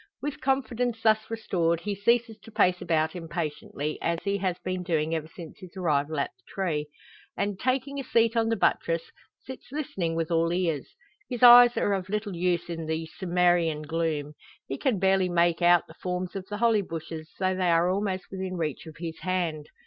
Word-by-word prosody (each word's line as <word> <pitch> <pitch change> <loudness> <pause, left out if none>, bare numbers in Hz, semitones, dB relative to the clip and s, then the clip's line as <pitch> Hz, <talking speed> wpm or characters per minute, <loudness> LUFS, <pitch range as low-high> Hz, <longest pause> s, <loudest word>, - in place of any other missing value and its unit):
With 290 0 -5
confidence 250 -3 0
thus 220 0 +3
restored, 170 -7 0
he 205 +2 -2
ceases 230 +3 +1
to 225 - -14
pace 180 -4 +2
about 160 0 0
impatiently, 155 -3 -4
as 170 0 0
he 200 0 0
has 185 -2 -1
been 185 0 -2
doing 160 -3 0
ever 160 -1 -2
since 165 +4 -11
his 185 -1 -12
arrival 155 -3 0
at - - -1
the - - -36
tree; 160 -6 -2 0.5
and, 200 -1 -2
taking 265 +2 -1
a - - -3
seat 230 -1 +2
on 225 -1 +2
the 225 - +2
buttress, 165 -4 +1 0.4
sits 260 +1 -9
listening 195 - -2
with 165 0 -2
all 165 0 +2
ears. 170 -6 -1 0.3
His 245 -2 -3
eyes 245 0 +9
are 205 - +2
of 190 -1 -3
little 210 -2 -2
use 175 0 0
in 165 -2 -5
the 160 +1 -2
Cimmerian 175 -4 +2
gloom. 155 -2 -2 0.3
He 135 - -4
can 255 -6 +1
barely 190 0 +2
make 170 0 +2
out 175 -1 +5
the - - -14
forms 180 +1 -4
of 190 -1 -5
the 210 - -4
holly 225 -2 +3
bushes, 160 -3 -7
though 185 -1 +1
they 185 -1 +1
are 170 +1 +4
almost 190 -1 -1
within 190 -1 -4
reach 160 -1 -3
of 160 - -11
his 165 -1 -6
hand. 170 -5 -2
180 Hz, 195 wpm, -27 LUFS, 165-210 Hz, 0.5 s, eyes